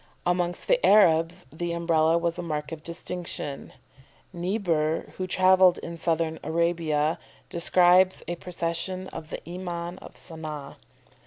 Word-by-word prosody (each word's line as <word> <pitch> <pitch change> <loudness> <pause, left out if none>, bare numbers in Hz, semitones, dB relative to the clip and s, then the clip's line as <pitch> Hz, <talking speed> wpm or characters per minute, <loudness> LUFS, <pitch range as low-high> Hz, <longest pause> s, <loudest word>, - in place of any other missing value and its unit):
Amongst 175 0 0
the - - +3
Arabs 175 -3 +4
the 170 +1 -3
Umbrella 165 -1 +2
was 170 0 -1
a - - -1
mark 150 -3 -4
of 160 -2 -6
distinction. 170 -3 -4 0.6
Niebuhr, 170 -4 -1
who 185 - -3
travelled 185 0 +5
in 170 - -7
Southern 165 -1 -1
Arabia, 160 -2 0 0.3
describes 180 +2 +4
a 175 - -2
procession 180 +2 -3
of 160 -1 -8
the - - -7
Iman 175 0 -5
of - - -13
Sanah. 155 -4 -8
170 Hz, 130 wpm, -26 LUFS, 160-180 Hz, 0.6 s, travelled